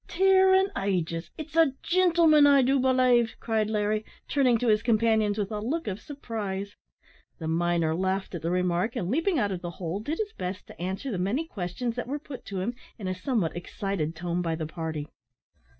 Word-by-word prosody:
"Tear 380 Hz, +1 st, +5 dB
an' 385 Hz, +1 st, +3 dB
ages! 170 Hz, -4 st, -1 dB
it's 310 Hz, 0 st, -8 dB
a 325 Hz, -5 st, +5 dB
gintleman, 335 Hz, -5 st, +5 dB
I 280 Hz, -2 st, +6 dB
do 270 Hz, +2 st, +3 dB
belave," 255 Hz, -3 st, +3 dB
cried 220 Hz, -2 st, 0 dB
Larry, 215 Hz, 0 st, 0 dB, 0.2 s
turning 255 Hz, -5 st, +3 dB
to 245 Hz, -, -1 dB
his 215 Hz, -1 st, +4 dB
companions 220 Hz, -2 st, +2 dB
with 205 Hz, -1 st, -2 dB
a 210 Hz, -, -2 dB
look 290 Hz, +10 st, -2 dB
of 200 Hz, 0 st, -3 dB
surprise. 205 Hz, -8 st, -5 dB, 0.6 s
The 160 Hz, -, -5 dB
miner 165 Hz, -1 st, +1 dB
laughed 190 Hz, +2 st, -1 dB
at 175 Hz, -, -4 dB
the 165 Hz, -, -1 dB
remark, 180 Hz, +5 st, 0 dB
and, 195 Hz, -5 st, -2 dB
leaping 330 Hz, +5 st, +1 dB
out 205 Hz, -6 st, +1 dB
of 180 Hz, -2 st, -4 dB
the 175 Hz, -, -4 dB
hole, 175 Hz, +2 st, -3 dB
did 295 Hz, +10 st, -3 dB
his 430 Hz, 0 st, -3 dB
best 185 Hz, -, -5 dB
to -, -, -13 dB
answer 190 Hz, +9 st, -3 dB
the 190 Hz, -, -2 dB
many 220 Hz, -, 0 dB
questions 225 Hz, -, -4 dB
that 245 Hz, -, -3 dB
were 280 Hz, +3 st, -2 dB
put 285 Hz, -3 st, -10 dB
to 195 Hz, -2 st, -4 dB
him 230 Hz, +6 st, -2 dB, 0.2 s
in 200 Hz, -5 st, -5 dB
a 185 Hz, -, 0 dB
somewhat 185 Hz, -, -1 dB
excited 175 Hz, -2 st, -3 dB
tone 175 Hz, +1 st, -2 dB
by 165 Hz, -2 st, -1 dB
the 160 Hz, -1 st, -4 dB
party. 160 Hz, -2 st, -4 dB
210 Hz, 200 wpm, -27 LUFS, 180-265 Hz, 0.6 s, I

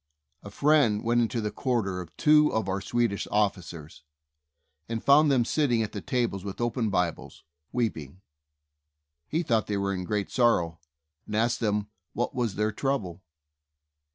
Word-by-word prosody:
A 100 Hz, -, -9 dB
friend 130 Hz, -3 st, +3 dB
went 120 Hz, +1 st, +2 dB
into 115 Hz, 0 st, -1 dB
the 105 Hz, -1 st, -2 dB
quarters 105 Hz, -8 st, -1 dB
of 85 Hz, -2 st, -13 dB
two 150 Hz, -1 st, +5 dB
of 110 Hz, -3 st, -1 dB
our 95 Hz, +1 st, -2 dB
Swedish 120 Hz, -2 st, -1 dB
officers, 90 Hz, -6 st, -2 dB, 0.9 s
and 115 Hz, -1 st, -3 dB
found 145 Hz, +2 st, +6 dB
them 130 Hz, -4 st, +3 dB
sitting 120 Hz, -7 st, +1 dB
at 105 Hz, -, -5 dB
the 100 Hz, -, -6 dB
tables 120 Hz, -7 st, -1 dB
with 100 Hz, -2 st, -6 dB
open 120 Hz, -1 st, 0 dB
Bibles, 90 Hz, -4 st, -2 dB, 0.3 s
weeping. 95 Hz, -, -3 dB, 1.1 s
He 165 Hz, +3 st, -1 dB
thought 115 Hz, -7 st, +1 dB
they 105 Hz, -, -1 dB
were 100 Hz, 0 st, -1 dB
in 90 Hz, -1 st, -3 dB
great 105 Hz, +1 st, -2 dB
sorrow, 90 Hz, -10 st, +2 dB, 0.5 s
and 105 Hz, -, -4 dB
asked 120 Hz, +2 st, +1 dB
them 105 Hz, -2 st, 0 dB, 0.3 s
what 120 Hz, -, -2 dB
was 120 Hz, -5 st, -1 dB
their 105 Hz, +1 st, 0 dB
trouble. 105 Hz, -10 st, -2 dB
110 Hz, 155 wpm, -27 LUFS, 100-120 Hz, 1.1 s, found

